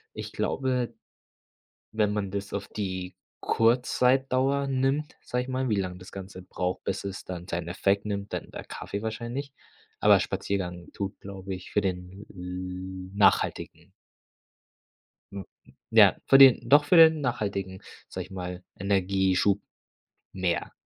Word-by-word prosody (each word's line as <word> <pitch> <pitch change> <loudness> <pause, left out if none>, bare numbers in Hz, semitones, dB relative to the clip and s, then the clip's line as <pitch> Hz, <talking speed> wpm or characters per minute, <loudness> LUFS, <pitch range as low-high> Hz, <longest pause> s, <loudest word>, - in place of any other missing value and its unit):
Ich - - -6
glaube, 130 -2 -1 1.0
wenn 105 -1 +1
man 100 -2 -2
das 100 0 -5
auf 100 -1 -3
die 95 -3 -4 0.2
Kurzzeitdauer 130 +3 +2
nimmt, 135 +3 0
sage 125 0 -2
ich - - -11
mal, 130 0 -1
wie 110 - +2
lang 90 -2 -3
das 90 - -12
Ganze 95 -1 -8
braucht, 90 0 -3
bis 95 - -3
es 100 0 -6
dann 90 -1 -7
seinen 85 0 -3
Effekt 100 +3 0
nimmt, 100 -1 -4
dann - - -5
der - - -7
Kaffee 100 - -6
wahrscheinlich. 120 +5 -4 0.5
Aber - - +6
Spaziergang 90 -3 -3
tut, 100 -1 -5
glaube 95 -1 -7
ich, 90 - -11
für 105 - +2
den 95 +1 -4
l 90 +1 -6
nachhaltigen 105 - +1 1.4
m 100 -1 -6 0.5
ja, - - +7
für 135 - +7
den 130 -3 +7
doch 145 +3 +6
für 165 - +3
den 160 -2 +7
nachhaltigen, 100 -6 -2 0.3
sage - - -6
ich - - -18
mal, 90 -1 -6 0.2
Energieschub 95 0 +2 0.7
mehr. 90 -2 -1
100 Hz, 140 wpm, -27 LUFS, 95-125 Hz, 1.4 s, ja